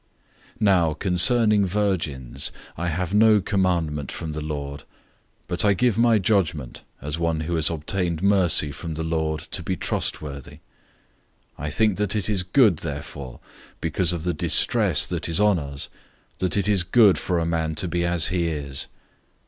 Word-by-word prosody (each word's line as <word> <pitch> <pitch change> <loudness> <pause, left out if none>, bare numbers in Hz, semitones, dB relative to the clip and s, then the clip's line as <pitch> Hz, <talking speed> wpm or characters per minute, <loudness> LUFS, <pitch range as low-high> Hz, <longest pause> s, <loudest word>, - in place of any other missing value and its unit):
007:025 - - -27
Now 90 -6 +3
concerning 105 +5 +3
virgins, 80 -10 -2 0.2
I 85 +2 -3
have 90 +3 -2
no 110 0 +5
commandment 85 -8 -1
from 80 -2 -5
the 75 0 -5
Lord, 70 -2 -5 0.6
but - - -1
I 100 -1 +3
give 120 +2 +2
my 115 0 +4
judgment 90 - -1 0.2
as 75 +3 -4
one 85 -1 0
who 85 +2 -3
has 80 -3 +2
obtained 85 +2 -2
mercy 95 -7 +3
from 80 +2 -6
the 80 - -3
Lord 80 -2 -2
to - - -1
be - - -3
trustworthy. 70 -3 -3
007:026 - - -19 1.0
I 75 +2 -3
think 105 +4 +1
that 105 0 -1
it 105 -1 -2
is 100 -3 +2
good 95 - +3
therefore, 70 -4 -7 0.4
because 90 -2 +1
of 85 -3 -4
the 90 0 -1
distress 75 - +3
that - - -4
is 85 - +2
on 105 -3 +3
us, 70 -1 -6 0.5
that 95 +2 0
it 100 - 0
is 100 -3 +3
good 100 +2 +4
for 90 - -1
a 85 - 0
man 80 -1 -1
to 90 - -1
be 85 0 -1
as 85 -1 +1
he 90 -2 0
is. 70 -4 -2
85 Hz, 175 wpm, -23 LUFS, 75-100 Hz, 1.0 s, no